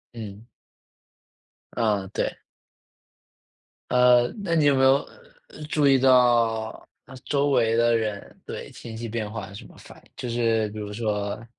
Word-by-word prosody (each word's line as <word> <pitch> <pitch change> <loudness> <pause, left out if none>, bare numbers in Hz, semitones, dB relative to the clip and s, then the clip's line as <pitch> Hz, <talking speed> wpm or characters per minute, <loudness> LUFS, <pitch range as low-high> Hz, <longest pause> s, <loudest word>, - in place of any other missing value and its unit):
嗯。 105 -1 -9 1.3
嗯， 105 -4 0
对。 - - -2 1.5
呃， 125 -1 +5 0.2
那 170 -4 0
你 155 -3 +3
有 145 -1 +4
没 130 - +2
有， 135 +1 +4 0.6
注 150 -3 +2
意 135 -1 +5
到， 120 -4 +2 0.2
那 130 - -13
周 145 0 +1
围 115 -4 +2
的 115 0 +3
人 110 -3 -4
对， - - -8
情 110 -1 -9
绪 115 +1 -5
变 110 -1 -4
化 110 -3 -6
有 100 - -13
什 100 - -10
么 - - -17
反 - - -15
应， - - -27
就 125 - -6
是 115 -2 0
比 105 +1 -8
如 105 -1 -6
说 105 0 -3
115 Hz, 165 characters per minute, -24 LUFS, 110-125 Hz, 1.5 s, 呃